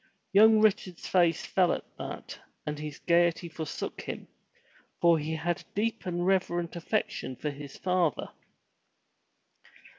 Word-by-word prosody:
Young 215 +2 +7
Richard's 190 -4 +1
face 170 -3 +3
fell 180 -2 +3
at - - -2
that - - -7 0.3
and 150 0 -3
his 150 -1 -6
gaiety 170 0 +2
forsook 160 -2 -5
him, - - -6 0.7
for 170 -2 +5
he 155 +2 -2
had 170 +3 -1
a - - -23
deep 220 -1 -1
and 175 0 -1
reverent 175 -3 +1
affection 170 -6 -2
for 150 +4 -3
his 140 -1 -9
father. 180 -5 0
175 Hz, 130 wpm, -29 LUFS, 160-185 Hz, 0.7 s, Young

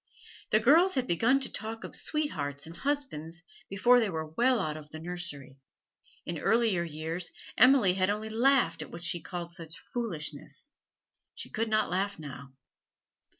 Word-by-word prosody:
The 215 - +4
girls 325 - +5
had 260 -2 +1
begun 230 +8 +3
to - - -2
talk 225 +1 -5
of - - -7
'sweethearts' 145 - -2
and 165 +1 -10
husbands 175 - -2 0.3
before 240 +6 +5
they 220 -4 +1
were 160 -3 -3
well 240 +11 +2
out 155 -6 -1
of 150 -1 -10
the 155 - -8
nursery. 155 -6 -4 0.7
In 170 -2 -4
earlier 220 -2 +3
years 165 +2 -3 0.2
Emily 250 -7 +6
had 185 +1 +1
only 210 +1 -2
laughed 230 - +3
at 155 - -7
what 170 - -8
she 175 0 0
called 170 0 -6
such 165 -1 -6
foolishness; 160 - -5 0.6
she - - -9
could 225 +1 -1
not 215 -5 +2
laugh 200 +2 0
now. 140 -3 -9
180 Hz, 160 wpm, -30 LUFS, 160-235 Hz, 0.7 s, Emily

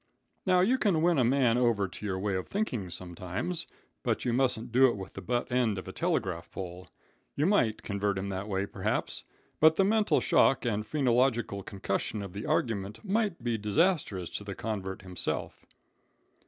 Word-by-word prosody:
"Now, 180 -1 +5
you 245 +8 +3
can 175 -7 +2
win 170 -4 +4
a - - +4
man 125 -1 +3
over 115 -5 +2
to 100 - -9
your 95 -2 -1
way 100 +1 -1
of 95 0 -2
thinking, 125 - -2
sometimes, 90 - -4 0.3
but - - -1
you 120 - +1
mustn't 125 -2 +1
do 130 +3 +6
it 120 - -1
with 95 -1 -8
the 95 - -7
butt 120 +6 -1
end 120 -5 +2
of 95 - -6
a - - -5
telegraph 85 -3 -1
pole. 90 -1 -7 0.5
You 145 - +1
might 160 - +2
convert 100 -1 -1
him 95 +1 -3
that 95 +1 -4
way, 100 -1 -1
perhaps, - - -2 0.3
but 160 +1 +6
the 195 - +3
mental 215 +1 +3
shock 135 - +3
and 105 -3 0
phrenological 125 -7 +1
concussion 100 +2 -3
of 95 -2 -8
the 100 +2 -5
argument 105 - -1
might 205 - 0
be 120 -2 0
disastrous 105 - +1
to - - -4
the 100 -1 -6
convert 95 -3 -4
himself. 90 -1 -3
110 Hz, 180 wpm, -30 LUFS, 95-135 Hz, 0.5 s, do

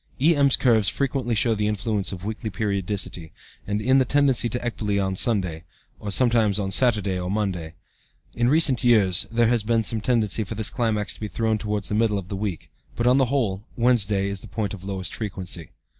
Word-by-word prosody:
E.M.'s 140 -2 +5
curves 110 -5 +3
frequently 130 -3 -1
show 115 +2 +3
the 105 -1 -1
influence 105 -1 -1
of 95 0 -7
weekly 110 +1 -4
periodicity, 100 -4 -2 0.4
in 105 +6 +2
the - - +4
tendency 135 -2 +2
to 125 - -2
ecbole 105 -4 -1
on 95 -1 -1
Sunday, 90 -7 0 0.4
or 105 - -6
sometimes 115 -2 +2
on 100 -2 -2
Saturday 105 -5 +1
or 90 0 -4
Monday. 95 -6 -3 0.6
In 120 0 +1
recent 145 -4 +2
years 105 -7 +4
there 115 0 +2
has 120 -2 +2
been 115 +1 +1
some 110 0 +1
tendency 110 -3 +1
for 105 +2 -7
this 110 -1 +1
climax 110 -3 -1
to - - -11
be 105 - -4
thrown 110 0 -1
towards 105 -1 -2
the - - -3
middle 105 -1 +1
of 95 -2 -7
the 100 - -4
week, 100 -4 -5 0.2
but, 120 - -2
on 125 +2 +4
the 135 - +4
whole, 115 -7 -1
Wednesday 105 -5 +2
is 100 0 -3
the - - -13
point 105 -3 -3
of 95 -2 -9
lowest 95 -2 -5
frequency. 90 -6 -5
105 Hz, 200 wpm, -23 LUFS, 100-120 Hz, 0.6 s, E.M.'s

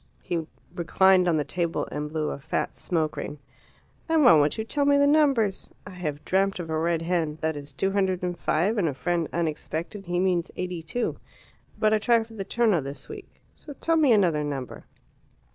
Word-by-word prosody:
He 165 -3 -3 0.3
reclined 185 +2 +3
on 165 -2 +3
the 150 - +1
table 170 +3 -2
and 150 0 -4
blew 155 -1 -2
a - - -6
fat 155 +3 -3
smoke 160 -3 -2
ring. 150 - -5 0.7
"And 320 -2 +4
why - - +9
won't 150 -1 +3
you 220 - -1
tell 285 +6 0
me 285 0 +4
the 285 - +4
numbers? 275 -9 +2 0.2
I 205 - -9
have 155 -6 -5
dreamt 195 +1 +1
of 165 -2 -5
a 160 - 0
red 165 0 0
hen 165 -3 -1
that 160 0 0
is 145 0 -8
two 195 +8 -1
hundred 190 -2 0
and 180 -1 -1
five, 190 +6 0
and 175 - +2
a 140 - -5
friend 170 +2 -1
unexpected 170 +4 -3
he 175 0 0
means 180 -2 +1
eighty 180 -2 -4
two. 230 +10 -3 0.6
But 215 0 +3
I 215 - +3
try 230 +1 +3
for 225 0 -15
the 205 -3 -4
Terno 215 - +2
this 140 +1 -7
week. 415 -2 -9 0.2
So 290 - -11
tell 330 +4 0
me 305 -5 +4
another 175 -9 +3
number." 140 -4 -5
175 Hz, 205 wpm, -26 LUFS, 160-215 Hz, 0.7 s, why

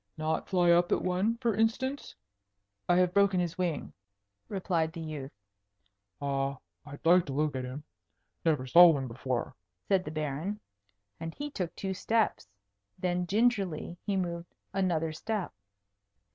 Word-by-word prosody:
"Not 155 0 -1
fly 175 -2 +4
up 175 +1 +4
at - - +2
one, 185 +6 +1
for 235 -2 +1
instance?" 230 +6 -1 0.7
"I 175 - +5
have 180 0 +3
broken 200 -2 +4
his 175 0 -2
wing," 170 -5 -2 0.6
replied 175 -5 0
the 170 - -7
youth. 155 -4 -6 0.9
"I 140 -1 -1 0.3
I'd 145 +2 -10
like 175 0 +5
to 135 - -4
look 150 0 0
at 130 -1 -2
him. 130 +4 -7 0.6
Never 150 -6 +2
saw 175 +7 +9
one 140 -5 +2
before," 125 +1 -3 0.3
said 190 -2 +3
the - - -6
Baron; 155 +6 -3 0.6
and 165 0 -6
he 290 0 -5
took 180 - -4
two 190 -1 -3
steps. 220 - 0 0.5
Then 180 -1 -1
gingerly 200 -6 +1
he 200 -2 0
moved 170 -2 -4 0.2
another 170 -5 0
step. 205 - -3
175 Hz, 145 wpm, -30 LUFS, 155-195 Hz, 0.9 s, saw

